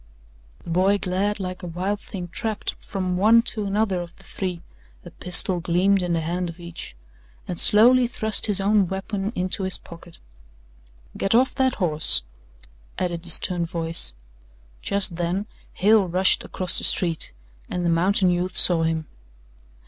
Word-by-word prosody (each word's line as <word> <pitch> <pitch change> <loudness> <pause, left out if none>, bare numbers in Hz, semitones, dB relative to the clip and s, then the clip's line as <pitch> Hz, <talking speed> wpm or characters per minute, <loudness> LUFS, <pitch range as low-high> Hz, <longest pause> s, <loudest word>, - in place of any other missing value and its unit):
The 170 - -7
boy 190 +4 +2
glared 200 +2 -2
like 185 -1 -5
a 180 - -7
wild 185 +5 -3
thing 180 -4 -8
trapped, 220 +4 -3
from 185 -2 -3
one 225 +4 +5
to 215 -4 -3
another 200 -2 0
of 170 -1 -10
the - - -19
three 180 -3 -5 0.4
a - - -10
pistol 180 0 +2
gleamed 180 +3 +1
in 175 -1 -2
the 165 - 0
hand 175 +2 -3
of 165 +1 -11
each 170 - -8 0.5
and 175 - -5
slowly 245 +4 +5
thrust 220 -2 +1
his 205 -2 +1
own 200 -1 +2
weapon 195 +2 -4
into 185 +2 -2
his 190 -1 -1
pocket. 170 0 -14 1.0
"Get 195 +3 0
off 255 +2 +3
that 260 -2 +1
horse," 155 - +1 0.7
added 175 -2 -2
the 175 - -2
stern 175 +1 +3
voice. 165 - +1 0.7
Just 195 -4 0
then 175 +4 -2 0.3
Hale 205 0 +3
rushed 185 +2 +2
across 185 -1 -2
the - - -8
street 170 -3 +1 0.4
and 180 -1 -3
the - - +2
mountain 185 +2 +2
youth 180 +1 -2
saw 175 -2 +6
him. 160 -1 -1
185 Hz, 160 wpm, -23 LUFS, 170-200 Hz, 1.0 s, saw